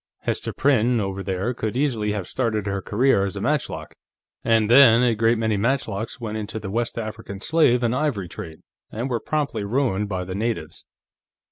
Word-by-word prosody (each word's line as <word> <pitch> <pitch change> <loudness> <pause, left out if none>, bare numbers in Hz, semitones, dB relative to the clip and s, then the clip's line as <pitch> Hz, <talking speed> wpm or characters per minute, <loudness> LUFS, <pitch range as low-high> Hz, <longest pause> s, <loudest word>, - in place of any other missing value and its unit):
Hester - - -2
Prynne, 125 -3 +2
over 95 -1 -3
there, 95 +5 -2
could 110 0 -3
easily 120 -7 0
have 100 -4 -3
started 110 -5 -1
her 100 -1 -2
career 110 -1 +2
as 100 -2 -3
a - - -4
matchlock. - - -2 0.5
And 115 -2 +3
then, 120 -1 +7
a 120 -2 +3
great 115 +2 +2
many 110 -2 0
matchlocks 115 -1 -1
went 110 -2 -4
into 110 +1 -5
the 100 -3 -6
West 120 +2 -2
African 110 -3 -6
slave 125 -2 +3
and 115 0 +1
ivory 125 -10 -1
trade, 85 -4 -9 0.3
and 120 +5 -3
were 120 - 0
promptly 145 -4 -2
ruined 105 -3 0
by 95 -2 -2
the 90 +1 -6
natives." 105 -6 -3
110 Hz, 180 wpm, -23 LUFS, 100-120 Hz, 0.5 s, then